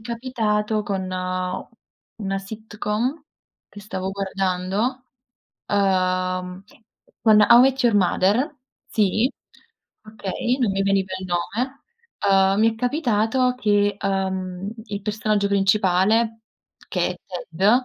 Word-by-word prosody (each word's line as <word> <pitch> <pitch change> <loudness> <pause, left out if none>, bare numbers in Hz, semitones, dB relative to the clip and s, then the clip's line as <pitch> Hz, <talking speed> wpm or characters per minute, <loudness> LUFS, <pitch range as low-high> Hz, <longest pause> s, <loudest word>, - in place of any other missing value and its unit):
capitato 220 -3 -1
con 195 -2 -2
una 185 +2 -5
sitcom 220 +6 -3 0.5
che 205 - -12
stavo 190 -2 -4
guardando, 195 +5 -2 0.6
uhm, 185 -1 0 0.6
con 215 -2 +6
"How 235 +3 +8
Met 265 +1 +3
Your 235 -3 +4
Mother", 205 - +2 0.4
sì, 215 +4 +2 0.7
okay, 220 +3 -3
non 235 -7 +1
mi 195 0 0
veniva 195 -1 +1
il 185 - -6
nome. 225 +10 -2 0.7
Uhm, - - -1
mi 225 +1 +5
è - - -9
capitato 250 -1 +1
che, 205 -3 +2
uhm, 190 -1 -2
il 205 -2 -5
personaggio 210 -1 0
principale, 200 +3 +2 0.5
che 180 -2 0
è 180 - -6 0.3
Ted, 190 +6 +3
205 Hz, 110 wpm, -23 LUFS, 190-225 Hz, 0.7 s, How